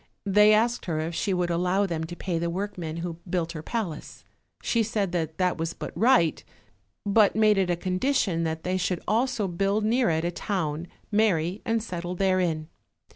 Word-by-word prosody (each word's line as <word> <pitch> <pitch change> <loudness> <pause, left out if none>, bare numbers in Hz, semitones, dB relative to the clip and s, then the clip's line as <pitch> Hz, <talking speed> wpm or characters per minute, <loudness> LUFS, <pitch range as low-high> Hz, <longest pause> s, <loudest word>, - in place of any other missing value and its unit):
They 210 +2 +6
asked 230 +3 +2
her 160 -3 -1
if 160 +2 -3
she 195 - -1
would 180 -2 0
allow 180 +4 +1
them 165 -4 -2
to 175 +2 -7
pay 175 -2 -2
the 170 0 -1
workmen 175 -3 -4
who 170 -1 -6
built 170 -2 -1
her 160 -2 -6
palace. 180 -5 -5 0.4
She 230 - +2
said 210 -4 -1
that 160 -3 -2
that 180 -2 +1
was 165 +1 -2
but - - -7
right, 225 -9 +3 0.6
but 205 0 +4
made 215 -2 +4
it 185 -2 +1
a 175 - +2
condition 185 0 0
that 160 0 -3
they 185 +1 0
should 180 -1 -1
also 235 -2 +1
build 195 +4 0
near 240 +1 +2
it 160 0 0
a 175 - 0
town, 170 -4 -3 0.2
marry 200 -3 +1
and 225 -1 0
settle 180 -3 -4
therein. 180 -4 +1
180 Hz, 185 wpm, -26 LUFS, 170-210 Hz, 0.6 s, They